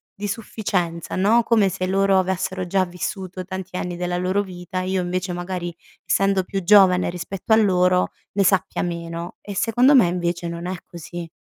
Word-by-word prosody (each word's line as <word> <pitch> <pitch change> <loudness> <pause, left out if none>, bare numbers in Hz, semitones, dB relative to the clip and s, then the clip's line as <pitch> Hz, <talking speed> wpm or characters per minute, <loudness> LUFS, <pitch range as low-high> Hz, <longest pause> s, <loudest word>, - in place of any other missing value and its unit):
di 205 +1 -4
sufficienza, 190 -6 -3
no, 210 +5 +4
come 220 -4 +3
se 185 0 -3
loro 195 0 +3
avessero 185 0 -2
già 190 +1 +2
vissuto, 185 +1 -5
tanti 190 -1 -6
anni 175 -1 -4
della 175 0 -2
loro 185 +3 0
vita, 185 0 -5
io 185 0 -1
invece, 180 +1 -2
magari, 175 -1 -4 0.3
essendo 195 -1 +2
più 195 +1 -3
giovane 185 -2 +5
rispetto 180 +4 -6
a 220 - +8
loro, 180 -4 +3 0.2
ne 200 0 +2
sappia 190 -1 +1
meno 170 0 -5
e 200 -2 -7
secondo 245 +7 +4
me, 240 -9 +6
invece 175 0 -2
non 170 +1 -5
è 185 - -2
così. 170 0 -8
185 Hz, 175 wpm, -22 LUFS, 175-195 Hz, 0.3 s, a